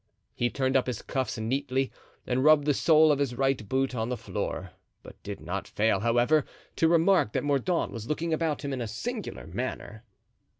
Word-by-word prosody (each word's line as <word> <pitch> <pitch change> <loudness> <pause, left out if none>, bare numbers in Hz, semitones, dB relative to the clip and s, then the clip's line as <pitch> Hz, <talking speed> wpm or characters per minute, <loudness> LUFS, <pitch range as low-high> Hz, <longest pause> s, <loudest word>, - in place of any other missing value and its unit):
He 120 - 0
turned 130 +1 -1
up 130 - +3
his 125 - -4
cuffs 130 -2 -2
neatly 130 +3 -1 0.3
and 130 +1 0
rubbed 155 -1 +6
the 150 - +3
sole 155 +2 +5
of 145 - +1
his 135 -4 -1
right 135 -5 0
boot 135 0 0
on 115 -1 -2
the 125 - -2
floor, 115 - -4 0.3
but - - -14
did - - -6
not - - -4
fail, 110 -2 +1
however, 120 +7 +3 0.3
to 165 - +4
remark 170 - +3
that - - 0
Mordaunt 145 +5 0
was 115 -1 -7
looking 160 +2 -1
about 160 -2 -1
him 140 - -2
in 130 - -3
a 115 - -3
singular - - -5
manner. 110 +2 -5
135 Hz, 195 wpm, -28 LUFS, 120-150 Hz, 0.3 s, rubbed